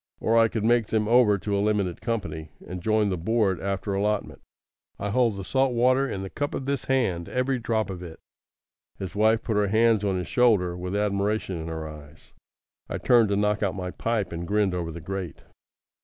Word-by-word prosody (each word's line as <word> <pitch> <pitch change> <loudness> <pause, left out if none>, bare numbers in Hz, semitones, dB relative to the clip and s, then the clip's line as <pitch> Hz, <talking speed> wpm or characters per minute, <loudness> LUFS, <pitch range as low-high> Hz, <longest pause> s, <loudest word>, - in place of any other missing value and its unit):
Or 115 - +1
I 115 0 +6
could 110 -1 -3
make 120 -1 +3
them 110 -1 0
over 115 -3 +5
to 100 +1 -2
a 100 - +1
limited 100 -4 0
company, 95 -10 -3 0.2
and 90 0 -6
join 110 +1 +2
the 90 -3 -2
board 100 0 +1
after 100 +1 -2
allotment. 105 +1 -1 0.6
I 105 - -3
hold 115 -2 +2
the 100 - -6
salt 130 +5 +1
water 130 +3 +3
in 95 - -4
the 95 - -6
cup 145 0 -3
of 135 - -4
this 140 0 -2
hand, 105 -11 0
every 130 0 0
drop 110 -3 -1
of 90 -2 -7
it." 85 -3 -9 0.8
His 95 -2 -6
wife 110 +2 +3
put 110 -3 -1
her 105 -1 +2
hands 110 0 +3
on 95 -2 0
his 90 -2 -4
shoulder 105 -8 +3
with 90 +2 -4
admiration 100 -3 -1
in 80 - -6
her 80 -1 -5
eyes. 75 0 -13 0.6
I - - -2
turned 115 -4 +4
to 100 - +1
knock 105 +1 +1
out 95 -3 0
my 90 -2 -4
pipe, 115 -1 -2
and 85 +1 -5
grinned 105 -1 +1
over 85 -2 -3
the 85 +1 -8
grate. 95 -1 -6
105 Hz, 210 wpm, -26 LUFS, 90-115 Hz, 0.8 s, I